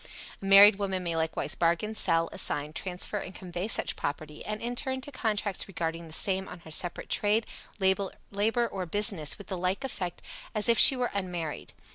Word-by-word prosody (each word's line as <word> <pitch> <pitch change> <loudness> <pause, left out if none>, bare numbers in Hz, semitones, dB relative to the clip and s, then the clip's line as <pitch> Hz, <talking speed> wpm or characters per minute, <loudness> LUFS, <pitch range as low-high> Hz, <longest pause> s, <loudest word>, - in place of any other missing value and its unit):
A - - -7
married 200 +1 +8
woman 190 -2 -2
may 170 -1 -3
likewise 160 0 -1
bargain, 170 +6 0
sell, 165 -5 +3
assign, 150 -6 0
transfer 185 +4 -4
and 185 - -9
convey 180 +1 -5
such 220 - 0
property, 150 +1 -5
and 210 0 -4
enter 245 +4 -2
into 260 +2 -4
contracts 210 -6 -2
regarding 165 -3 -4
the - - -13
same 190 +3 +1
on 175 - -10
her 160 - -13
separate 175 +2 -1
trade, 210 +2 +1 0.3
labor 200 +4 0
or 190 -4 -5
business 195 -5 +2
with 200 - -11
the 190 -1 -5
like 185 +7 -1
effect 185 -9 -5 0.3
as 215 +1 +3
if 235 -1 +4
she 270 - +10
were 250 -1 -2
unmarried. 175 -6 -4
190 Hz, 180 wpm, -28 LUFS, 170-210 Hz, 0.3 s, she